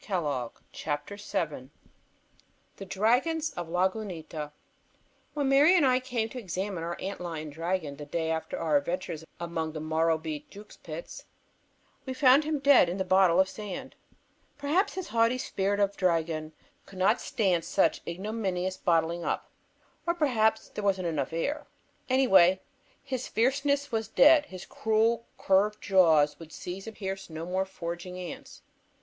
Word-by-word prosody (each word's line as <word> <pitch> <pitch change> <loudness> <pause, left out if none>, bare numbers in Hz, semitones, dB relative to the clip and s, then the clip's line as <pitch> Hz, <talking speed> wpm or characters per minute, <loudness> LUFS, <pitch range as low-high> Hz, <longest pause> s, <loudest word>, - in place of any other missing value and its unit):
[Illustration: 170 -7 0 0.3
THE 150 +6 -5
DRAGON 170 -10 -3
OF - - -28
LAGUNITA] - - -37 1.1
THE 195 - -7
DRAGON 240 - +1
OF 170 -2 -5
LAGUNITA 180 -5 -2 0.8
When 285 -2 0
Mary 290 +6 +6
and 315 - +4
I 255 -1 +4
came 245 -3 -2
to 250 - -7
examine 190 -3 -4
our 170 +1 -4
ant 195 0 -5
lion 160 -3 -5
dragon 165 -2 -3
the 145 - -8
day 160 -1 -1
after 160 0 -3
our 155 -3 +2
adventures 165 +1 -3 0.2
among 165 -2 -3
the 155 - -5
Morrowbie 160 -1 -1
Jukes 205 +1 -13
pits, 160 +1 -8 0.8
we 260 - -3
found 265 +2 +5
him 310 -1 0
dead 275 -10 +5
in 180 - -3
the 190 - 0
bottle 185 -2 +4
of 190 - +5
sand. 215 +7 -7 0.6
Perhaps 310 +9 +1
his 375 -2 -5
haughty 230 +2 +2
spirit 200 -4 -1
of 200 0 +1
dragon 165 -3 0 0.3
could 195 - -12
not 195 +6 +3
stand 185 -7 +1
such 170 -1 +1
ignominious 185 0 -2
bottling 170 0 +1
up, - - -3 0.6
or 340 - +2
perhaps 225 -9 +1
there 210 - -6
wasn't 190 -3 +1
enough 155 -1 -2
air. 285 - -2 0.4
Anyway, 190 -9 +5 0.4
His 260 -2 -4
Fierceness 280 +4 +1
was 225 -2 -1
dead. 295 +5 +6
His 185 -1 -9
cruel 225 +2 +1
curved 205 +2 +2
jaws 160 -6 +4
would 165 -1 -11
seize 190 +4 -7
and 220 - -7
pierce 195 -1 -5
no 160 +1 -6
more 185 +2 -1
foraging 180 -1 -6
ants. 180 -2 -8
190 Hz, 155 wpm, -28 LUFS, 165-230 Hz, 1.1 s, Mary